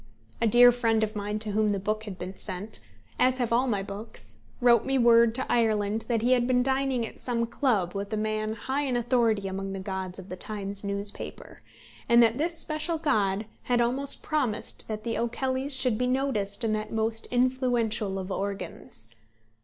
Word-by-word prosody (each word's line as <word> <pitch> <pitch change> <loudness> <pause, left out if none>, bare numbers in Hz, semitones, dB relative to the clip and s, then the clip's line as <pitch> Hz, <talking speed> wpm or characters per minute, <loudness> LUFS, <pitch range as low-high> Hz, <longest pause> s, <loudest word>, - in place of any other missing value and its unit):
A 230 - +3
dear 245 +3 +8
friend 225 -2 +1
of 215 0 -2
mine 210 0 -2
to 215 -1 -2
whom 215 +1 +2
the 205 -1 0
book 215 +2 -2
had 200 -4 -7
been 185 +1 -6
sent 195 +3 -4 0.4
as 255 0 +3
have 240 -3 0
all 250 +3 +3
my 205 -5 0
books 200 +3 -9 0.2
wrote 240 -3 +5
me 270 0 0
word 235 -2 +5
to 260 - 0
Ireland 220 -2 +1
that 230 -2 0
he 245 - +2
had 245 -1 +3
been 250 -1 +3
dining 265 -2 0
at - - -11
some 235 -2 -1
club 225 -8 0
with 200 +1 -4
a 215 - -1
man 215 0 -1
high 265 +6 -2
in 260 -4 0
authority 230 -4 +1
among 195 0 -4
the 195 - -4
gods 190 -1 -5
of 190 0 -10
the 185 - -5
Times 200 +1 -4
newspaper, 200 0 -5 0.5
and 235 0 +7
that 230 +2 +2
this 335 +2 +1
special 320 +1 +1
god 210 -9 +1 0.2
had 245 -1 +2
almost 260 +4 +1
promised 255 -8 -2
that 215 -1 -5
The 230 - -2
O'Kellys 260 +4 -2
should 255 -4 0
be 250 - +1
noticed 250 -5 -1
in 220 -1 +1
that 215 0 -3
most 225 0 -1
influential 245 -5 +1
of 190 0 -5
"organs." 195 - -5
225 Hz, 190 wpm, -27 LUFS, 205-250 Hz, 0.5 s, dear